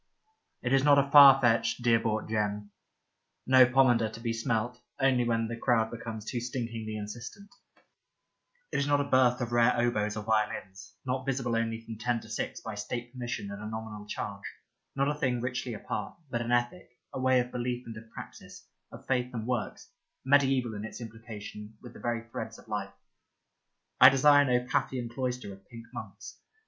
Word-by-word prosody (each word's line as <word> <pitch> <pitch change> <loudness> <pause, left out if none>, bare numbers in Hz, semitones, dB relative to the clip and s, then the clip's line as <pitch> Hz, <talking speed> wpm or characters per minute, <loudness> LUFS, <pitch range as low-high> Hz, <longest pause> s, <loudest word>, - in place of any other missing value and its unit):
It 125 +1 0
is 135 0 +4
not 145 -1 +6
a 140 0 +2
far 140 -2 +10
fetched, 115 -1 +2
dear 115 -1 +4
bought 110 -1 -2
gem; 105 -1 -2 0.7
no 130 -1 +7
pomander 120 -3 +3
to 115 - -10
be 115 0 -2
smelt 115 +2 -2 0.2
only 135 -2 +3
when 115 -1 0
the 115 - -4
crowd 115 -2 +1
becomes 115 -2 -7
too 120 0 -3
stinkingly 115 -3 -4
insistent; 120 - -8 1.2
it - - 0
is 140 - 0
not 145 0 +3
a - - +2
birth 130 -3 +3
of 120 -1 -3
rare 120 +1 +3
oboes 105 -3 0
or 105 - -4
violins, 105 -2 -2
not 130 0 -2
visible 125 -3 -1
only 115 0 -1
from 110 -2 -8
ten 120 0 0
to 110 - -14
six 110 - -4
by 110 - -6
state 120 +3 -5
permission 120 -5 -5
at 100 - -7
a 105 - -6
nominal 110 -1 -7
charge, 100 -1 -5 0.5
not 140 0 +1
a 145 - +1
thing 130 -5 -1
richly 125 -1 -3
apart, 105 -1 -5
but 120 - -1
an 120 0 -3
ethic, 120 +2 -1 0.2
a - - -4
way 130 0 +4
of 125 0 -2
belief 125 0 -3
and 115 - -8
of 110 0 -11
practice, - - -11 0.3
of - - -12
faith 125 -1 0
and 110 -1 -3
works, 125 -2 -3 0.3
mediaeval 135 -3 +3
in 105 0 -6
its 110 - -7
implication 110 -2 -9
with 120 -2 -12
the - - -12
very 115 -1 -3
threads - - -6
of - - -17
life. - - -3 1.1
I - - +11
desire 145 +2 +5
no 125 -1 +1
Paphian 125 -2 -1
cloister 125 -3 -4
of 95 0 -17
pink 115 -1 -10
monks. - - -9
120 Hz, 185 wpm, -29 LUFS, 110-125 Hz, 1.2 s, I